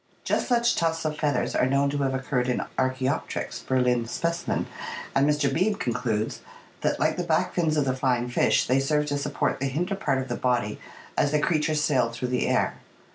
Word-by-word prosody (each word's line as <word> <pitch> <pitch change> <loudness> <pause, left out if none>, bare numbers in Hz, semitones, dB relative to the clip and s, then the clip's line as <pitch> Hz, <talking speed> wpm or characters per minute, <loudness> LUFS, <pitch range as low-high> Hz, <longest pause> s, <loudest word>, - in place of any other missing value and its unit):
Just - - 0
such 235 -1 +3
tufts 165 -1 0
of 155 -1 -1
feathers 150 -2 0
are 125 - +3
known 140 +1 +2
to 145 - -2
have 135 -1 0
occurred 130 -1 -1
in 125 - 0
Arck 130 0 +1
Bopteryx 130 - -2
(Berlin 125 -2 +1
specimen), 170 +7 -1 0.5
and 140 +2 +3
Mr. 145 -2 +1
Beebe 190 +8 +2
concludes 115 - -2 0.4
that, - - 0
like - - +1
the - - -1
back - - +1
fins 160 -3 +1
of 145 - +2
the 130 -1 0
flying 125 -2 +1
fish, 125 - +2
they 130 +1 +3
served 150 +2 +1
to 145 - 0
support 145 0 -1
the 135 - 0
hinder 170 +9 -1
part 145 -9 0
of 130 0 -3
the 120 - -2
body 120 -5 0 0.4
as 145 - +2
the 150 - +3
creature 155 -1 +1
sailed 130 -6 +2
through 125 +1 -3
the 125 0 0
air. - - +1
135 Hz, 205 wpm, -26 LUFS, 125-150 Hz, 0.5 s, such